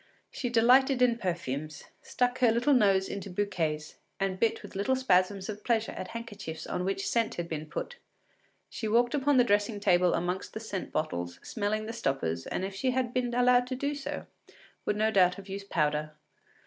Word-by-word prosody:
She 245 - -3
delighted 250 +3 +5
in 235 -1 +3
perfumes, 155 - -3 0.2
stuck 250 0 -1
her 245 -3 +5
little 240 +6 +3
nose 195 -6 +4
into 200 0 -5
bouquets, 175 -6 -2 0.2
and 190 -1 -1
bit 230 - +1
with 205 - -11
little 205 +7 +1
spasms 195 -6 +2
of 210 -1 -6
pleasure 225 -2 +1
at - - -6
handkerchiefs 205 -8 -7
on 180 - -3
which 195 +1 -1
scent 230 -1 +1
had 175 -1 -3
been 155 -2 -5
put; 485 - -5 0.7
she 220 - -5
walked 240 +3 +3
upon 285 -1 +2
the 250 - +7
dressing 205 -1 +1
table 180 -3 +3
among 180 +2 -1
the - - -4
scent 210 -4 -5
bottles, 90 - -3
smelling 215 0 -2
the 225 - -5
stoppers, 110 - -2
and 185 - -2
if 195 - -5
she 255 +7 -1
had 250 -1 0
been 250 -1 0
allowed 245 0 +4
to 255 - -3
do 280 +3 -1
so 285 -1 -5 0.6
would 210 - +2
no 220 +1 +2
doubt 180 -3 +4
have 195 +1 -11
used 200 +1 -7
powder. 150 -1 0
205 Hz, 190 wpm, -29 LUFS, 180-240 Hz, 0.7 s, the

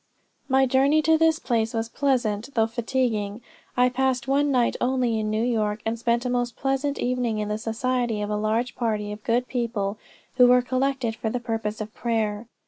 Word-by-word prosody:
"My 265 0 +4
journey 275 +4 +3
to 320 +2 +4
this 320 0 +3
place 230 -6 -1
was 225 0 -1
pleasant, 240 -3 -1
though 225 -1 +4
fatiguing. 225 -3 -1 0.4
I 250 0 +5
passed 255 0 0
one 285 +2 +2
night 250 -3 +2
only 245 -3 +1
in 215 0 -2
New 215 +1 0
York, 215 -3 0
and 225 +1 -2
spent 235 +1 0
a - - 0
most 245 -1 -1
pleasant 270 +1 -1
evening 245 -3 -1
in 210 0 -2
the 210 +1 -2
society 235 0 -1
of 205 - -3
a - - 0
large 220 +4 0
party 215 -4 -1
of 210 0 -8
good 245 +2 +1
people 225 -5 -2 0.4
who 250 -1 +7
were 250 0 +5
collected 255 -2 -1
for 220 - -3
the 245 - -2
purpose 225 -3 -3
of 215 +1 -6
prayer. 220 -2 -2
240 Hz, 195 wpm, -25 LUFS, 220-255 Hz, 0.4 s, who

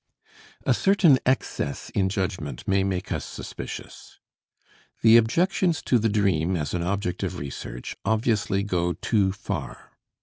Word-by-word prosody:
A - - +4
certain 185 -9 +4
excess 130 - -1
in 95 -1 +1
judgment 95 -6 -3
may 95 0 +3
make 95 -1 -2
us - - -1
suspicious. - - -8 0.9
The 115 0 +8
objections 170 - +2
to 125 - +3
the 110 +1 +1
dream 95 -4 +1
as 75 -2 -3
an 90 - -1
object 90 +1 -2
of - - -3
research 70 -3 -6
obviously 110 -2 +1
go 90 -3 0
too 100 -2 +1
far. 95 - -6
100 Hz, 135 wpm, -25 LUFS, 90-115 Hz, 0.9 s, The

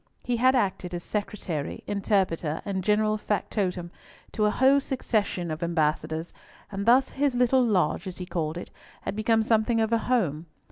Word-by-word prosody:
He 245 -1 -1
had 255 +3 +4
acted 185 -6 -1
as 175 - -5
secretary, 190 -8 -4
interpreter, 190 -6 0
and 190 -2 -2
general 215 +1 +2
factotum, 185 -4 -2 0.4
to 215 - 0
a - - +4
whole 265 +5 +4
succession 215 - -1
of 155 +2 -5
ambassadors, 160 -1 -1 0.4
and 200 +1 -4
thus 260 +3 +5
his 280 -2 0
little 250 +1 +4
loge, 210 -3 +1
as 185 - -6
he 180 - -5
called 165 -3 -3
it, 175 - -8 0.3
had - - -4
become 220 +1 +2
something 225 +1 +2
of 220 +1 +1
a 230 - +3
home. 175 - 0
205 Hz, 170 wpm, -26 LUFS, 175-230 Hz, 0.4 s, thus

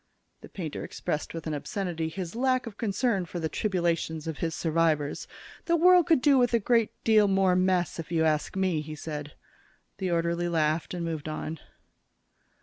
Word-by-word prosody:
The - - -12
painter 165 -6 -5
expressed 150 - -4
with 165 -2 -7
an 155 - -2
obscenity 165 +1 -3
his 180 +2 -6
lack 255 +1 +1
of 225 -3 -8
concern 205 -3 0
for 175 - -5
the 160 - -1
tribulations 170 -4 -1
of 160 -2 -5
his 165 -2 -2
survivors. 160 -3 0 0.4
"The 340 - +3
world 355 +1 +6
could 320 -7 +3
do 280 -3 +5
with 245 -1 +3
a - - +3
good 230 0 +2
deal 215 -2 +5
more 190 -2 +3
mess, 185 -2 +1
if 165 - -6
you 165 -1 +2
ask 155 +2 0
me," 185 -5 +1
he 155 0 -7
said. 150 -1 -6 0.7
The 190 -2 -1
orderly 170 0 0
laughed 160 +1 0
and 170 -1 -3
moved 160 -2 -4
on. 155 0 -5
175 Hz, 180 wpm, -28 LUFS, 160-205 Hz, 0.7 s, world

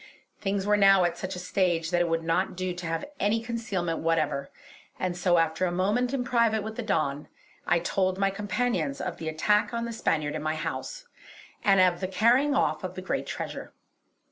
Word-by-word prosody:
Things 195 -1 -1
were 210 0 +3
now 195 -2 +6
at 175 -1 +1
such 185 0 -5
a 180 0 -7
stage 175 -4 0
that 175 0 +2
it 175 - +2
would 165 0 0
not 180 +3 0
do 185 -1 -2
to 175 -1 -6
have 165 0 -2
any 210 +3 +2
concealment 220 -8 -3
whatever; 160 -4 0 0.5
and 185 -1 -1
so 175 0 +2
after 165 +2 +1
a - - -2
moment 205 +8 +1
in 270 -2 -1
private 230 -3 +2
with 220 +1 -6
the 245 - -3
Don, 150 -9 -1 0.4
I 175 - +4
told 185 +2 0
my 195 0 +2
companions 245 +7 -1
of 180 - -4
the 160 - -4
attack 210 +8 +1
on 235 0 -2
the 235 - -5
Spaniard 155 -9 0
in 155 - -3
my 155 +1 -1
house, - - -5 0.6
and 195 -3 +5
of 180 -2 +4
the 185 - -2
carrying 245 +9 +3
off - - +1
the - - -5
great - - -2
treasure. - - -6
185 Hz, 200 wpm, -27 LUFS, 170-220 Hz, 0.6 s, now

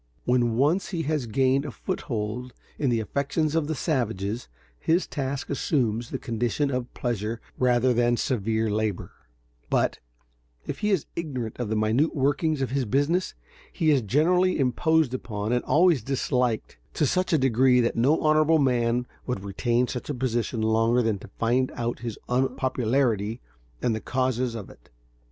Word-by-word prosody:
When 120 -2 +2
once 155 +9 +2
he 170 -4 -2
has 150 -4 -1
gained 130 +4 +2
a 145 - -5
foothold 120 - -4 0.2
in 140 - +1
the 115 -2 +2
affections 140 +6 -1
of 160 -2 +1
the 160 - -2
savages, 115 - -2 0.3
his 170 +3 +2
task 135 -1 -3
assumes 120 -5 0
the - - -3
condition 120 +5 -1
of 125 -1 -3
pleasure 115 -2 -2 0.2
rather 125 0 +3
than 120 0 +2
severe 110 -2 0
labor; 105 -2 -2 0.6
but, - - +1 0.7
if - - -5
he 210 - 0
is 190 -7 +1
ignorant 130 -9 -4
of 120 -4 -2
the 110 - 0
minute 110 +9 +1
workings 145 +1 +1
of 130 - -3
his 135 -1 0
business, 145 - 0 0.4
he 160 -2 +2
is 140 -3 +3
generally 175 - +2
imposed 145 +2 +2
upon 105 -4 -3
and 125 0 +1
always 165 -4 +4
disliked 125 - -1 0.2
to 150 - +2
such 185 +6 0
a 160 - +4
degree 130 -1 +4
that 120 -1 +1
no 135 +7 +3
honorable 155 +1 +4
man 125 -3 +1 0.2
would 125 -7 -2
retain 120 +5 0
such 125 +2 -5
a 145 - -2
position 120 -2 -1
longer 115 +2 +3
than 110 -3 0
to - - -11
find 125 +3 +1
out 120 0 -2
his 115 -3 -5
unpopularity 125 -3 0 0.4
and 120 - +2
the 110 - -3
causes 130 -2 -1
of 105 -5 -6
it. - - -20
125 Hz, 165 wpm, -26 LUFS, 115-145 Hz, 0.7 s, always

